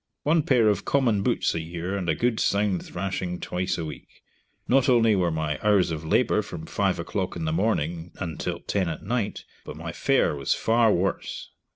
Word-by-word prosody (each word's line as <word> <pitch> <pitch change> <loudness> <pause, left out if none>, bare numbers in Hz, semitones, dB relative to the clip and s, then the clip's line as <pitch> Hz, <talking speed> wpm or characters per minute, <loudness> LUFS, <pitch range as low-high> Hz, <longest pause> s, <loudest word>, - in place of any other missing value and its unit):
One 160 +2 +3
pair 125 -6 +3
of 105 - +2
common 120 -8 +2
boots - - +1
a 80 - -2
year, 85 +3 -4
and 90 -4 -2
a - - +2
good 120 -2 0
sound 100 -2 +1
thrashing 90 -1 -4
twice 90 +1 -2
a 85 - -3
week. 75 - -8 0.6
Not 135 +1 +3
only 115 -3 +5
were 90 -3 +2
my 80 -3 -2
hours 100 -5 +3
of 80 0 -4
labor 105 +6 +2
from 135 +10 -8
five 100 - 0
o'clock 95 +2 -3
in 85 -2 -3
the 80 - 0
morning 85 -3 -1
until 85 -5 -4
ten 95 -4 -1
at 80 - -6
night, 115 0 -2 0.2
but 75 - -8
my 85 +1 -5
fare 135 - +2
was 70 -1 0
far 115 -1 +3
worse. 95 +1 -2
95 Hz, 195 wpm, -25 LUFS, 85-110 Hz, 0.6 s, only